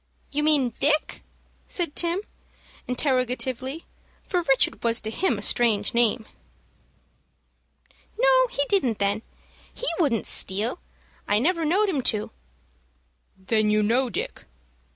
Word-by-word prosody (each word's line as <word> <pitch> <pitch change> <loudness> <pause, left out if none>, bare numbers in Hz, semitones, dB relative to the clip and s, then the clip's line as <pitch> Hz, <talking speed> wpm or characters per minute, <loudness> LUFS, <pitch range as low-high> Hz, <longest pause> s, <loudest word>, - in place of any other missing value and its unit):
"You 295 - -1
mean 290 -6 +2
Dick?" 300 +2 +1 0.5
said 340 -5 -2
Tim, 345 +2 +2 0.7
interrogatively, 255 +2 -1 0.4
for 360 -3 -1
Richard 270 -6 +1
was 230 0 +2
to 220 - -5
him 245 - 0
a 205 - -5
strange 215 -4 +2
name. 235 -1 +2 1.9
"No, - - +4
he 285 -11 -1
didn't, 260 - +1
then. 200 +1 0 0.5
He - - -4
wouldn't 270 - +1
steal. 215 - 0 0.5
I 205 - +2
never 330 - +1
know'd 390 +7 +2
him 295 -8 0 0.2
to." 210 - -7 1.1
"Then 210 +3 0
you 210 0 +2
know 245 +4 +2
Dick?" 210 - -5
255 Hz, 120 wpm, -25 LUFS, 220-325 Hz, 1.9 s, No